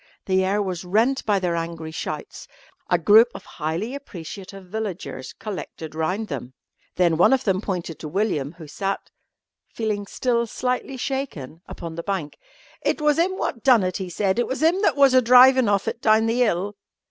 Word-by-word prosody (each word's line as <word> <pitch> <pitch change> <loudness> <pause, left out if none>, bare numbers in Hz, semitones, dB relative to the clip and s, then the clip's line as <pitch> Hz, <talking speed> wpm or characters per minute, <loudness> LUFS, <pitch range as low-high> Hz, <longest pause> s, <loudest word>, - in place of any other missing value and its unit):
The 190 0 +2
air 200 +2 +1
was 185 -2 -4
rent 225 +9 +1
by 205 -2 +3
their 180 -3 -1
angry 165 -1 -4
shouts. 160 - -6 0.4
A 175 - +4
group 210 +7 +6
of - - -9
highly 165 - -4
appreciative 195 - -9
villagers 185 -9 -5
collected 185 -6 -7
round 180 +7 -2
them. 130 - -6 0.4
Then 170 -3 +3
one 175 - +5
of 265 - +1
them 190 -2 +1
pointed 175 -6 -4
to 155 - -6
William, 165 -5 -1
who 165 -2 -11
sat, 195 +6 -4 0.6
feeling 210 -3 -2
still 235 0 0
slightly 250 +3 -2
shaken, 240 - -4
upon 165 -1 -7
the 170 - -5
bank. 175 -5 -4 0.4
"It - - 0
was 300 0 +2
'im 375 +3 +1
wot 230 - -3
done 245 -5 +5
it," 185 0 -1
he 190 -2 -5
said, 190 +4 0
"it 240 - +1
was 265 +4 -3
'im 345 +4 +3
that - - +3
was 275 -2 +5
a 255 - +6
drivin' 255 0 +7
of 200 -1 +1
it 235 - -3
down 220 0 +4
the 230 +2 +1
'ill." 200 +1 -1
200 Hz, 185 wpm, -23 LUFS, 170-240 Hz, 0.6 s, drivin